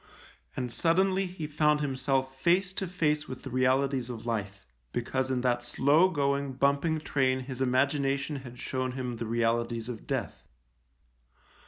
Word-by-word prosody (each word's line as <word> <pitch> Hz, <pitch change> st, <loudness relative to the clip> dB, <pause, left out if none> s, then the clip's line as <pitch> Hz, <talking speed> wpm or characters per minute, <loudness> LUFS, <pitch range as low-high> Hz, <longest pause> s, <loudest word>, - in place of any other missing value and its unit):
And 125 Hz, -2 st, -3 dB
suddenly 190 Hz, +3 st, +2 dB
he 180 Hz, -3 st, -6 dB
found 150 Hz, 0 st, +2 dB
himself 135 Hz, -1 st, -1 dB
face 180 Hz, +3 st, +3 dB
to 190 Hz, 0 st, -2 dB
face 155 Hz, -4 st, 0 dB
with 130 Hz, -, -8 dB
the 135 Hz, -, -7 dB
realities 130 Hz, 0 st, +1 dB
of 115 Hz, -2 st, -6 dB
life 100 Hz, -4 st, -3 dB
— -, -, -43 dB
because 130 Hz, +2 st, -1 dB
in 130 Hz, -1 st, 0 dB
that 120 Hz, -1 st, +1 dB
slow 145 Hz, +8 st, +4 dB
going, 140 Hz, -4 st, 0 dB
bumping 140 Hz, +4 st, +1 dB
train 130 Hz, -3 st, +1 dB
his 130 Hz, 0 st, -6 dB
imagina 135 Hz, +2 st, +2 dB
tion 140 Hz, +1 st, -4 dB
had 125 Hz, -2 st, -10 dB
shown 130 Hz, 0 st, -2 dB
him 125 Hz, -2 st, -4 dB
the 115 Hz, -, -4 dB
realities 115 Hz, 0 st, 0 dB
of 115 Hz, -3 st, -7 dB
death. -, -, -3 dB
130 Hz, 160 wpm, -29 LUFS, 125-150 Hz, -, slow